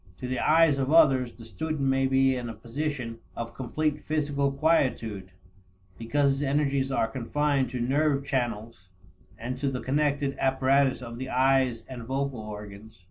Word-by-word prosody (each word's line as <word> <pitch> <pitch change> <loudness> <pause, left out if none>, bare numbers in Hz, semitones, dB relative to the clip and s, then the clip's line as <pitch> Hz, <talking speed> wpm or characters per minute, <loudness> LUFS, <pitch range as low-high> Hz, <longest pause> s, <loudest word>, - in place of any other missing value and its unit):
To 125 - -5
the 130 0 -2
eyes 160 -3 +4
of 135 +1 0
others, 135 -7 +5
the 115 - -13
student 150 +8 -4
may 135 0 +2
be 135 0 +3
in 120 -2 -4
a 115 - -7
position 120 0 -4 0.2
of 115 0 -5
complete 150 +5 -2
physical 145 -2 0
quietude, 125 - 0 0.7
because 140 +5 +1
his 135 +1 -2
energies 140 -1 0
are 115 - +1
confined 135 +3 0
to 125 0 -4
nerve 140 +3 +1
channels 115 -8 -3 0.5
and 120 +3 -5
to 140 - 0
the 130 -1 -3
connected 140 0 0
apparatus 135 0 +2
of 120 0 -8
the 130 0 -5
eyes 130 -2 +2
and 130 -2 -8
vocal 135 +1 -3
organs. 105 -1 -9
135 Hz, 160 wpm, -27 LUFS, 115-140 Hz, 0.7 s, others